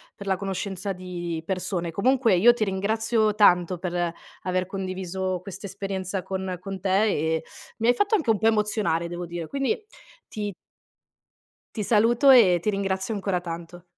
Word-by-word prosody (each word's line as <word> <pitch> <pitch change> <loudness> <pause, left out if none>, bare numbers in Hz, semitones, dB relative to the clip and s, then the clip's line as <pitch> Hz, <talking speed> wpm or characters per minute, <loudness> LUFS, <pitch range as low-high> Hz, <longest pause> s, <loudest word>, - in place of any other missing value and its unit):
per 200 -2 -9
la 190 - +2
conoscenza 195 0 -4
di 175 -2 -5
persone. 180 -1 -2
Comunque, 230 +4 +2
io 235 +7 +6
ti 240 - -1
ringrazio 215 +2 +1
tanto 180 -4 +4
per 175 -1 -2 0.3
aver 185 0 -1
condiviso 185 -1 -3
questa 195 +2 -8
esperienza 190 -1 -4
con 190 0 -4
con 195 0 -6
te, 195 +3 +2
e 160 -3 0 0.3
mi 225 0 0
hai 245 - +5
fatto 410 +1 +1
anche 320 - +2
un 220 - +4
po' 220 - -2
emozionare 210 -6 +1
devo 175 +1 -5
dire. 170 -1 -6
Quindi 280 - -1 0.4
ti 205 -2 -4 1.2
ti 215 - -2
saluto 230 +6 +4
e 200 -10 +7
ti 215 - 0
ringrazio 195 +1 -1
ancora 195 -3 -1
tanto. 170 0 -7
190 Hz, 160 wpm, -25 LUFS, 180-215 Hz, 1.2 s, e